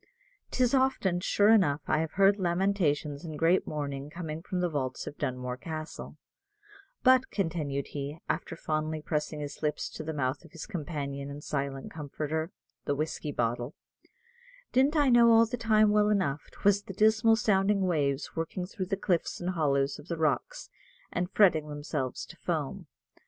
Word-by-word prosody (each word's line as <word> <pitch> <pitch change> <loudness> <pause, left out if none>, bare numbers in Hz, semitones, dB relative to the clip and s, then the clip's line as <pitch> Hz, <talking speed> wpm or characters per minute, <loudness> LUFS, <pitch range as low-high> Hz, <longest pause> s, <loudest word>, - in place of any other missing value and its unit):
'Tis 250 -1 +1
often, 260 -9 +2
sure 205 +3 +3
enough, 150 -10 +4
I - - +2
have 160 -1 -2
heard 195 +1 +4
lamentations 170 -6 0
and 155 -3 -6
great 170 +4 +3
mourning 140 -2 -4
coming 160 -1 -5
from 185 +1 -3
the 180 - +2
vaults 135 -5 -3
of 145 - -7
Dunmore 125 -1 -3
Castle; 155 +2 -7 0.9
but," 255 0 +5
continued 155 -7 -2
he, 145 +1 -5
after 165 - -2
fondly 155 -1 -2
pressing 150 -1 -2
his 145 -1 -7
lips 150 -1 -1
to - - -8
the 160 - -3
mouth 140 -1 -2
of 165 - -17
his 165 - -7
companion 140 -6 -4
and 145 +1 -8
silent 140 -1 -3
comforter, 155 +1 -3 0.4
the 145 - 0
whiskey 150 0 -3
bottle, 120 +4 -2 1.0
"didn't 270 +5 +3
I 290 -3 +4
know 240 -1 +7
all 225 0 +7
the 235 +2 -3
time 215 -3 +4
well 210 0 +4
enough, 180 -9 0
'twas 200 0 +2
the 195 - -9
dismal 220 +3 +4
sounding 200 -2 +2
waves 150 -6 0
working 165 +2 -3
through 190 0 -5
the 195 - -1
cliffs 180 -4 0
and 180 +1 -2
hollows 140 -5 +1
of 150 - -13
the 170 - -3
rocks, 155 -3 -1 0.4
and 180 0 -1
fretting 170 -7 +4
themselves 145 -3 -3
to - - -13
foam. - - -3
160 Hz, 170 wpm, -29 LUFS, 145-195 Hz, 1.0 s, know